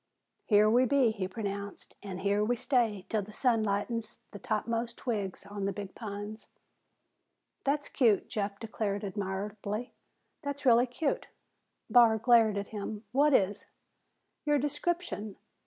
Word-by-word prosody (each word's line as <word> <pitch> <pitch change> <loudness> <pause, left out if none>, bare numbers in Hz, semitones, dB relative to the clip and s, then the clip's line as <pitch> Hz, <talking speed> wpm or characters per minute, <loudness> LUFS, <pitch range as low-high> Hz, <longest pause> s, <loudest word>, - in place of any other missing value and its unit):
"Here 210 -1 +5
we 245 +4 +5
be," 255 -2 +4
he 200 -4 -3
pronounced, 200 0 -5
"an' 195 -3 -6
here 200 +2 +1
we 240 +3 +1
stay 230 -6 +1
'til 215 - 0
the 200 +2 -9
sun 230 0 +2
lightens 215 +2 -2
the 205 - -9
topmost 230 +3 -2
twigs 205 -7 -3
on 200 -1 -4
the 200 - 0
big 195 0 -7
pines." 210 0 -7 1.2
"That's 290 +1 +1
cute," 225 -7 +3
Jeff 200 -4 -3
declared 210 -3 -3
admiringly. 205 +3 -4 0.5
"That's 285 -1 -5
really 245 0 +6
cute!" 275 +4 -2 0.6
Barr 235 -3 +6
glared 225 -2 +4
at 200 0 -3
him. 210 0 -5
"What 285 +2 +4
is?" 200 -1 +1 0.8
"Your 295 -1 +3
description. 290 - -2
215 Hz, 140 wpm, -30 LUFS, 200-245 Hz, 1.2 s, really